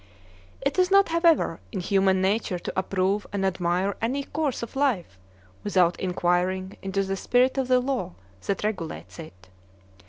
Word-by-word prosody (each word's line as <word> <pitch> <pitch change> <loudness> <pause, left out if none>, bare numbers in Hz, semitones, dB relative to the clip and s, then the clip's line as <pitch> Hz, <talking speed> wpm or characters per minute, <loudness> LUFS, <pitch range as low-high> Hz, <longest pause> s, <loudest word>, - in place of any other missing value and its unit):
It 275 +6 0
is 365 0 +4
not, 395 -1 +5
however, 335 - +3
in 195 - -3
human 190 0 +2
nature 195 -1 0
to 175 - -6
approve 190 +2 0
and 200 -1 -1
admire 185 +1 0
any 260 +5 -1
course 290 -4 -2
of 235 - -8
life 215 - 0 0.4
without 180 -4 +2
inquiring 185 +1 0
into 195 0 -1
the 195 0 -2
spirit 250 +6 +2
of 260 - 0
the 255 -1 +4
law 255 - -2 0.3
that 200 - -1
regulates 190 -6 -4
it. 90 - -11
195 Hz, 155 wpm, -25 LUFS, 185-255 Hz, 0.4 s, not